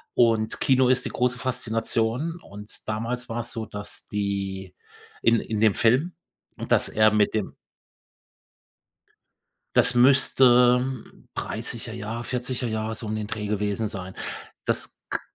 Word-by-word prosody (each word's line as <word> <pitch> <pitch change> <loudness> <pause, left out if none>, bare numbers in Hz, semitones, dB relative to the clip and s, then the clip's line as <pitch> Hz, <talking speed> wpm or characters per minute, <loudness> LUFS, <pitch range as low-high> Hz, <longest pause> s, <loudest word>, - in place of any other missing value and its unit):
Und 115 -2 +2
Kino 130 -1 +4
ist 125 -1 +3
die - - -2
große 125 0 0
Faszination. 120 +5 -1
Und 105 +1 -12
damals 120 +3 -3
war 115 +1 -2
es 120 - -7
so, 115 -2 -4
dass 105 -1 -8
die 100 -2 -3 0.5
in 115 -1 +4
in 110 -2 -3
dem 110 -3 +4
Film 130 +10 +2 0.4
und - - -7
dass - - +4
er 110 0 +4
mit 105 -1 +2
dem 110 -3 -2 2.2
Das 125 - +6
müsste 125 -1 +5 0.5
30er - - -4
Jahre, 115 +3 -5
40er 125 0 -3
Jahre 110 0 -2
so 115 - -5
um 105 - -2
den 105 -1 -3
Dreh 105 -1 -4
gewesen 105 +1 -1
sein. 95 -2 -6 0.5
Das - - -2
k - - -1
115 Hz, 140 wpm, -25 LUFS, 105-125 Hz, 2.2 s, Das